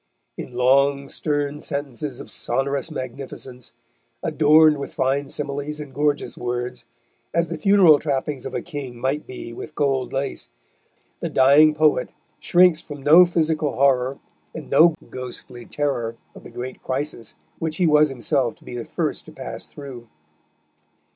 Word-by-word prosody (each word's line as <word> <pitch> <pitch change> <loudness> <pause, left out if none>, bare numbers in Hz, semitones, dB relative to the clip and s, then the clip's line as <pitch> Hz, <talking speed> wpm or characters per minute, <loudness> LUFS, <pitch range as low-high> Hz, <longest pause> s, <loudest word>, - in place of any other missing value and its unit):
In - - -8
long, 140 +3 +3
stern 145 -1 -2
sentences 140 -2 -4
of - - -9
sonorous 140 +3 -1
magnificence, 130 -2 -7 0.5
adorned 155 0 +5
with 140 - -7
fine 135 +1 0
similes 145 +1 -4
and 145 -3 -8
gorgeous 145 0 0
words, 125 0 -4 0.5
as 170 -1 +1
the 165 - -4
funeral 180 -4 +6
trappings 140 -2 -2
of - - -7
a - - -3
king 145 -7 -7
might 135 +4 -2
be 115 -2 -8
with 150 - -9
gold 135 -3 0
lace, 135 0 -3 0.7
the - - -3
dying 150 +3 +5
poet 155 -4 +2 0.3
shrinks 175 -2 +4
from 145 -2 -10
no 170 +5 +8
physical 160 -3 0
horror 135 -1 +2 0.4
and - - -8
no 165 0 +6 0.2
ghostly 125 -1 -8
terror 120 -6 -2 0.2
of - - -13
the - - -11
great 125 +1 -7
crisis 130 -3 -4 0.2
which 160 -1 -3
he 180 - +2
was 150 -1 +5
himself 125 -1 0
to - - -23
be - - -7
the 120 - -5
first - - -3
to - - -10
pass - - -7
through. 130 -5 -10
140 Hz, 150 wpm, -22 LUFS, 130-150 Hz, 0.7 s, no